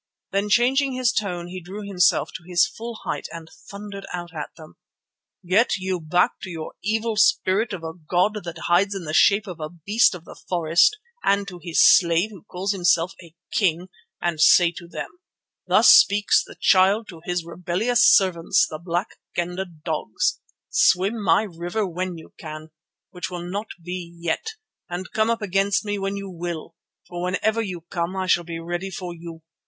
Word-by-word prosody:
Then 200 +2 0
changing 260 +5 +3
his 255 -3 +1
tone 180 -5 -2
he 185 +1 -7
drew 195 +5 -8
himself 180 -3 +2
to 185 - -8
his 175 0 +3
full 230 +5 -8
height - - -3
and 165 -1 -9 0.2
thundered 200 -1 -8
out 175 -1 -6
at 150 -3 -5
them: 155 -1 -14 0.7
"Get 215 +7 +3
you 185 -1 -2
back 170 +3 +1
to - - -7
your 160 -3 -6
evil 220 +2 -1
spirit 215 0 +3
of 185 -4 -6
a 160 0 -5
god 180 +6 0
that 170 -1 -7
hides 195 +4 +2
in 190 - -5
the 155 -1 -5
shape 200 +5 +4
of 180 -4 -8
a 155 -1 -4
beast 195 +6 +2
of 170 -1 -11
the - - -11 0.2
forest 175 - +3 0.3
and 200 0 +2
to 180 -2 -8
his 170 -2 +2
slave 170 +3 +5
who 195 -5 -12
calls 190 +3 -3
himself 175 -2 +2
a 170 -2 -16 0.2
king, 180 -2 0 0.3
and 170 -3 -1
say 170 +2 +6
to 170 0 -11
them: 340 - -8 0.5
'Thus - - +6
speaks 205 +1 +5
the - - -13
Child 200 +3 +4
to 165 -3 -11
his 175 -2 -2
rebellious 180 +8 0
servants, 180 -4 +4
the 155 - -7
Black 175 +3 -2 0.3
Kendah 180 +2 -2 0.2
dogs: 155 -9 -1 0.3
Swim 200 +5 +3
my 175 +3 +4
river 175 +2 -3
when 180 0 -4
you 160 - -14
can, 155 0 -8 0.4
which 180 -1 -5
will 175 -1 -6
not 205 +4 -4 0.2
be 175 -1 -6
yet, 170 - -3 0.3
and 180 +1 -5
come 220 +1 +1
up 230 -2 -1
against 195 +2 +1
me 205 -1 -2
when 195 +1 -2
you 200 0 -6
will; 175 -3 -6 0.3
for 175 -1 -6
whenever 215 +5 0
you 185 -6 -5
come 170 +1 -2
I 190 -1 -1
shall 175 -1 +2
be 170 -1 -6
ready 175 +3 -4
for 180 -1 -6
you. 165 -1 -10
180 Hz, 185 wpm, -23 LUFS, 170-200 Hz, 0.7 s, say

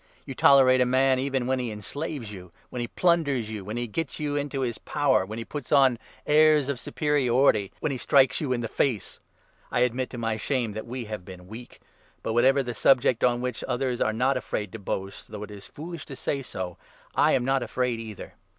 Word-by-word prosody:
You 135 - -6
tolerate 130 -1 +6
a - - +5
man 130 +1 +3
even 135 -1 -1
when 130 +1 0
he 125 -2 -2
en 105 - -6
20 - - -10
slaves 140 - -5
you, 90 -3 -11 0.2
when 125 - -5
he 120 - -2
plunders 145 -9 +1
you, 105 -3 -5
when 105 +4 -5
he 120 - -1
gets 130 +5 -4
you 145 -1 -2
into 145 -1 -2
his 120 -3 -2
power, 140 -10 +1
when 110 +2 -6
he 115 - -5
puts 145 +1 -7
on 135 -5 +5 0.3
airs 150 -2 +5
of 140 -3 -2
superiority, 130 - +2
when 150 - 0
he 130 - -3
strikes 135 0 +4
you 145 -4 -2
in 120 -2 0
the 115 - -2
face! 115 -3 -1 0.5
I - - 0
admit, 125 +1 +1
to 125 - -8
my 115 -2 -1
shame, 120 0 -1
that 110 +2 -6
we 125 0 -5
have 105 -3 -6
been 95 0 -10
21 90 - -16
weak. 115 +4 -11 0.4
But 110 - -2
whatever 135 +4 +4
the 120 -1 -4
subject 125 -2 +3
on 120 -1 +3
which 125 0 -3
others 125 -1 -1
are - - +2
not 130 +4 +1
afraid 105 -5 -4
to 115 - -7
boast 95 0 -5
— - - -30
though 105 -1 -7
it 105 - -9
is 100 -1 -10
foolish 165 +2 -8
to 135 - -8
say 140 +1 -2
so 95 -8 -6 0.2
— - - -28
I - - +4
am 125 - +2
not 135 0 +2
afraid 125 -2 -1
either 110 -3 -8
125 Hz, 235 wpm, -26 LUFS, 110-135 Hz, 0.5 s, tolerate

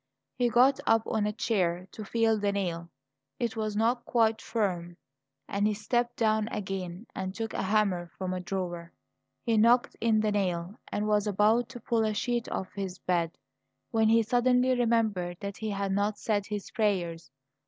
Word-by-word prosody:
He 245 -1 +1
got 255 +4 +5
up 225 0 +4
on 215 -2 0
a - - 0
chair 185 -5 0
to 215 - -7
feel 225 +1 +2
the 205 0 +1
nail; 170 -4 -3 0.5
it 235 -2 -2
was 215 -1 -2
not 235 +3 +1
quite 225 -2 +2
firm, 180 -6 -2 0.5
and 200 +1 +1
he 210 - 0
stepped 240 +3 0
down 220 -1 +2
again 190 -2 -5
and 190 0 -4
took 225 0 -4
a - - -1
hammer 190 -3 +1
from 185 -1 -3
a 185 - -2
drawer. 175 -2 -4 0.5
He 230 -2 +2
knocked 235 +3 +4
in 225 -1 +3
the 215 -1 +1
nail, 185 0 -1
and 210 +1 -1
was 210 0 +2
about 215 +4 +3
to 245 - -8
pull 230 0 0
a 215 -1 0
sheet 240 +1 -1
off 190 - -4
his 190 -2 -4
bed, 170 -2 -1 0.5
when 220 -1 +3
he 230 0 +5
suddenly 250 +2 +3
remembered 220 -7 +1
that 200 -2 -5
he 220 - -3
had 200 -1 -2
not 205 +2 0
said 205 -2 -1
his 210 -2 -5
prayers. 175 - -1
210 Hz, 180 wpm, -29 LUFS, 190-225 Hz, 0.5 s, got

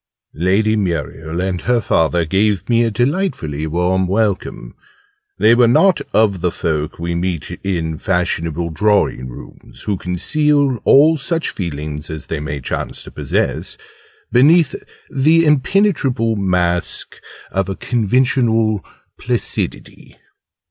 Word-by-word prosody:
Lady 100 +7 +1
Muriel 85 -3 -3
and 95 -1 -2
her 125 0 +1
father 85 -4 +1
gave 95 +2 0
me 120 -1 +3
a 115 - +1
delightfully 115 - -1
warm 90 +3 0
welcome. 95 - -2 0.6
They 110 +3 +5
were 120 0 +5
not 185 +10 +4
of 105 -5 +2
the 90 - +1
folk 75 -3 -3
we 85 +1 -3
meet 85 -2 -3
in 80 -5 -2
fashionable 85 -3 -1
drawing 100 -7 +1
rooms - - -12
who 100 -2 -1
conceal 140 - +1
all 155 +4 +6
such 165 +3 -2
feelings 75 -3 -5
as 80 0 -6
they 80 - -4
may 75 -1 -4
chance - - -3
to - - -11
possess - - -2 0.5
beneath 150 +4 +5 0.4
the 160 +5 +3
impenetrable 140 - +2
mask 90 -3 -1 0.3
of 95 0 -1
a 95 - -3
conventional 115 -2 +1 0.4
placidity. - - -3
95 Hz, 120 wpm, -18 LUFS, 85-125 Hz, 0.6 s, all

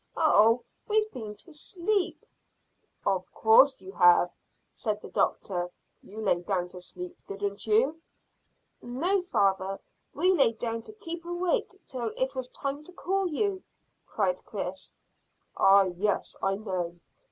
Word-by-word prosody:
"Oh! 230 -6 +5 0.2
We've 430 0 +2
been 215 -4 -7
to 330 +9 -8
sleep." 360 +5 -1 0.8
"Of 190 -2 0
course 260 +5 +5
you 190 - -9
have," 175 -1 +5 0.4
said 215 -2 -2
the - - -11
doctor. 180 -2 0 0.3
"You 210 +3 -11
lay 185 -5 +2
down 180 -1 -1
to 180 0 -10
sleep, 180 0 -8
didn't 200 +1 -4
you?" 260 +10 +3 0.8
"No, 340 +11 0
father; 195 - +1 0.4
we 360 +6 +4
lay 275 -9 +4
down 230 0 -3
to - - -9
keep 340 -5 -4
awake 365 +4 -1
till 240 -4 -3
it 260 0 +1
was 260 -2 -4
time 275 +3 -4
to 365 - -10
call 380 +1 -1
you," 380 +3 -1 0.5
cried - - 0
Chris. - - -5 0.6
"Ah, 195 0 +6
yes, 190 +2 -1
I 195 0 +1
know. 185 -5 -3
230 Hz, 140 wpm, -28 LUFS, -, 0.8 s, Ah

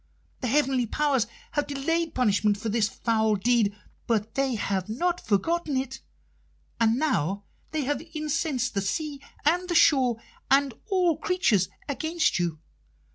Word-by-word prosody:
The 255 - -2
heavenly 265 -2 +2
powers 275 -2 +1 0.2
have 290 - -1
delayed 325 +4 -1
punishment 210 -4 +2
for 220 +2 -4
this 215 -1 +1
foul 220 -2 +1
deed, 205 0 +2 0.3
but 225 -2 0
they 270 -2 0
have 195 -2 -2
not 345 +10 0
forgotten 290 - 0
it, 265 0 -4 0.8
and 230 0 +3
now 200 - 0 0.3
they 310 -2 -2
have 290 +2 -1
incensed 300 -4 -1
the 200 - 0
sea 280 +8 -3 0.2
and 355 +4 +2
the 345 - 0
shore 255 -7 +5 0.3
and 275 -1 +4
all 360 -6 +2
creatures 315 - +2 0.2
against 315 - 0
you. 170 -3 -1
260 Hz, 140 wpm, -26 LUFS, 220-305 Hz, 0.8 s, shore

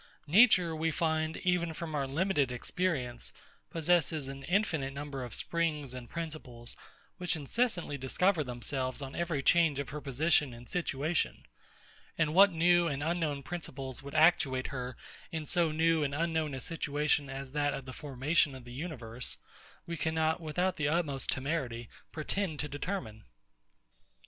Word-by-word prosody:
Nature, 180 -1 +6
we 160 +1 +1
find, 160 -1 0
even 175 -3 +1
from 165 -1 -5
our 140 -2 0
limited 145 -2 +1
experience, 125 -2 -1 0.4
possesses 160 -3 +2
an 135 0 -6
infinite 160 -7 +1
number 140 -2 -4
of 120 -3 -6
springs 155 -6 -1
and 125 -2 -8
principles, 150 -8 -5 0.4
which 180 -1 0
incessantly 165 - 0
discover 165 +6 +2
themselves 130 +1 -3
on 135 0 -7
every 170 -5 -1
change 165 -3 +4
of 140 -3 -3
her 150 +3 -5
position 145 -1 +2
and 120 +1 -12
situation. 160 -2 -1 0.7
And 155 -2 +2
what 200 +3 +8
new 175 +1 +4
and 145 -2 -2
unknown 160 -4 -1
principles 135 -6 -5
would 140 +1 -9
actuate 155 -5 +4
her 125 -1 -4 0.3
in 160 -2 -3
so 170 -1 +2
new 160 0 +3
and 140 0 -1
unknown 160 -2 0
a - - -4
situation 150 -1 0
as 135 0 -6
that 145 0 +1
of 135 - -7
the 130 - -7
formation 145 +2 +1
of 130 -2 -10
a 120 - -10
universe, 125 -5 -3 0.5
we 170 0 -4
cannot, 160 +1 +1
without 180 +4 0
the 150 - +1
utmost 150 -4 0
temerity, 130 -5 -2 0.2
pretend 160 +1 -2
to 150 - -3
determine. 140 - -4
150 Hz, 150 wpm, -32 LUFS, 135-170 Hz, 0.7 s, what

